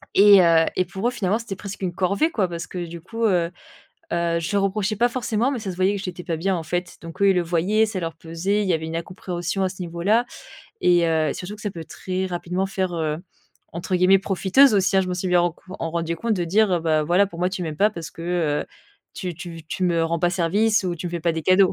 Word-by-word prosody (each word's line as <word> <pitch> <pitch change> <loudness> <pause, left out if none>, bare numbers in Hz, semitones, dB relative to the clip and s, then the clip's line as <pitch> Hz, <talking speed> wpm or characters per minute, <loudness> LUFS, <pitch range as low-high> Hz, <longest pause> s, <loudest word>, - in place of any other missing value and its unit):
et 200 -1 +8
heu 165 -1 +5
et 185 - +1
pour 190 +6 -3
eux, - - +1
finalement, 210 -2 0
c'était 230 -4 -6
presque 200 +1 -8
une 180 -2 -2
corvée 200 - +1
quoi. 205 - +1
Parce 170 0 -5
que 180 -1 -5
du 170 0 -9
coup, 225 +6 -5
heu, 175 -5 +2 0.6
heu, 170 -1 +1
je 200 +5 -2
reprochais 200 +2 0
pas 240 +4 +3
forcément, 240 0 0
mais 270 - -2
ça 205 -4 -4
se 175 - -7
voyait 190 +2 +2
que 195 - -5
j'étais 180 -2 -6
pas 165 - -2
bien 185 +3 0
en 165 - -3
fait. 175 +2 -3
Donc 165 +3 -10
eux, 200 - +6
ils - - +3
le 180 - +3
voyaient, 180 +6 +2
ça 210 -3 -4
leur 165 -1 -4
pesait. 165 +6 -1
Il 200 - -2
y - - +3
avait 160 0 -2
une 160 +1 -4
incompréhension 180 +2 -3
à - - +2
ce 185 0 -8
niveau-là 180 +7 +1 0.6
et 175 -1 +4
heu 160 -2 +2
et - - -3
surtout 200 +4 -6
que 215 - -13
ça 205 - -2
peut 165 -3 -8
très 185 +3 -4
rapidement 180 +1 -2
faire, 190 -2 -2
heu, 155 -2 -1 0.6
entre 170 +2 -2
guillemets 185 +2 +5
«profiteuse» 195 +7 +4
aussi, 195 -1 +2
hein, - - +6
je 185 - -4
me 180 - -1
suis 185 +1 -2
bien 180 -1 +4
en 175 -1 -1 0.2
en 165 - -2
rendue 170 0 -2
compte 230 +5 0
de 180 -3 -1
dire, 190 0 +2
ben 160 -1 +2
voilà 180 +6 +3
pour 170 -4 -11
moi 180 - +2
tu 185 -1 -4
m'aimes 155 -2 -5
pas 205 +5 +4
parce 170 -6 -7
que, 165 - -10
heu, 170 -4 0 0.5
tu 180 -3 -4
tu 175 +2 -8
tu 160 - -11
tu 185 - -2
me 170 -2 +2
rends 165 +1 -1
pas 175 - +2
service 195 +4 +2
ou 180 -1 -1
tu 175 +2 -5
me - - -4
fais 170 -1 -3
pas 170 0 +1
des 160 0 -3
cadeaux 185 +2 +4
180 Hz, 270 wpm, -23 LUFS, 170-195 Hz, 0.6 s, et